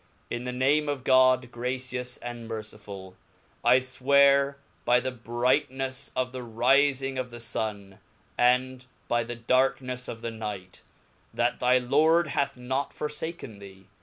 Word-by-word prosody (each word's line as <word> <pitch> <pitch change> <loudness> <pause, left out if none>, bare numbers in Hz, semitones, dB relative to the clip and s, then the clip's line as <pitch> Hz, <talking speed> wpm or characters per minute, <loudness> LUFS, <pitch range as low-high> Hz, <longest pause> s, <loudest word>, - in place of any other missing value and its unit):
TN 120 +1 -3
the 125 - -2
name 140 +4 +2
of 140 -3 -3
God, 130 -1 +4
gracious 125 0 -3
and 120 -1 -7
merciful 105 -4 -8 0.5
1. - - +5
I - - +7
fwear 140 +2 +3 0.3
hv 125 0 +4
the 130 - -1
Mahomet 120 -2 -17 0.5
brightneflfe 130 -1 -4
of 130 0 -1
the 130 - -6
rifing 135 +3 +2
of 125 -1 -3
the 120 0 -9
Sun, 105 -4 -5 0.4
and 125 +1 +2 0.2
by 120 0 +1
thedarknefleof 125 0 -1
compiiins 115 -1 -6
Nighr, 100 -4 -6 0.6
chat 120 +1 +1
thy 125 +1 +4
Lord 155 +6 +3
hath 140 -2 -1
not 130 +3 -3
forfaken 150 -7 -5
thee. 95 -1 -14
125 Hz, 140 wpm, -27 LUFS, 115-130 Hz, 0.6 s, I